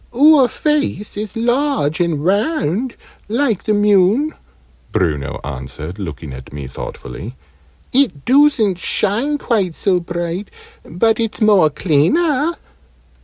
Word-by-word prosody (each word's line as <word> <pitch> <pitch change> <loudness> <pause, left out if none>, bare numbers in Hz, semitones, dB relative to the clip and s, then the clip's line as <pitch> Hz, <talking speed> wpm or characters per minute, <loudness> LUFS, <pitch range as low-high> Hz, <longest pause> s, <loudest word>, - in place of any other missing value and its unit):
"Oor 290 0 +6
face 290 -5 -1
is 210 +1 -5
large 240 - 0
and 165 -4 0
round 215 - 0 0.3
like 235 -3 0
the 215 - +2
moon," 205 +8 +3 0.6
Bruno 75 -7 -1
answered, 75 +6 -7
looking 80 -6 -6
at 65 0 -10
me 70 -1 -7
thoughtfully. 65 - -8 0.6
"It 235 - +1
doosn't 255 -8 +3
shine 225 - 0
quite 200 - -1
so 185 -3 +1
bright 175 +2 -4 0.3
but 220 +8 +1
it's 225 -2 -2
more 205 -8 +5
cleaner." 280 - +1
205 Hz, 115 wpm, -18 LUFS, -, 0.6 s, Oor